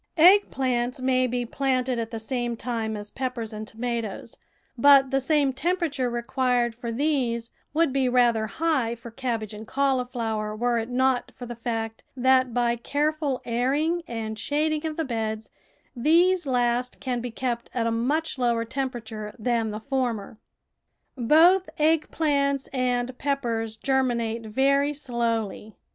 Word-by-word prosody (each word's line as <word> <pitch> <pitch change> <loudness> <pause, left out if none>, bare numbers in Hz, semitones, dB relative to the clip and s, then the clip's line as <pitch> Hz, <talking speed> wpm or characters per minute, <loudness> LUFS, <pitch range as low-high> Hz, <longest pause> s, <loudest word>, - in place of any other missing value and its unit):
Egg 375 +6 +7
plants 250 -1 -1
may 255 0 +2
be 245 0 -2
planted 255 -1 0
at 225 -1 -3
the 230 - -5
same 240 +1 -2
time 225 -3 -3
as 205 0 -6
peppers 250 -4 -4
and 215 0 -6
tomatoes, 230 -2 -4 0.4
but 275 +1 +6
the 270 - +3
same 280 0 +2
tem 345 +8 0
perature 285 -8 -1
required 240 0 0
for 235 0 -5
these 240 -4 0 0.2
would 310 -2 +2
be 265 -2 +2
rather 240 -3 +3
high 260 -1 0
for 235 0 -11
cabbage 230 -4 -3
and 215 +1 -9
cauliflower 245 -6 -1
were 240 +1 +1
it 225 +1 -4
not 255 0 +1
for 245 - -8
the 240 - -6
fact 225 -1 -4
that 255 0 +4
by 235 0 +1
careful 290 +2 -1
airing 280 +8 +1
and 220 -2 -4
shading 305 +3 0
of 310 - -5
the 325 - -1
beds 220 -3 -3 0.4
these 340 +6 +3
last 245 -1 0
can 250 -2 -2
be 245 - -4
kept 240 0 -3
at 235 -2 -1
a 230 - +1
much 280 +6 -1
lower 235 -2 +1
temperature 230 -4 -5
than 230 0 0
the 210 0 -4
former. 230 -4 -2 0.8
Both 325 +9 +5
egg 310 +1 +2
plants 280 -3 +1
and 250 -1 0
peppers 230 -6 -1
germinate 235 -4 0
very 275 +5 +2
slowly. 230 -6 -2
245 Hz, 150 wpm, -25 LUFS, 230-275 Hz, 0.8 s, Egg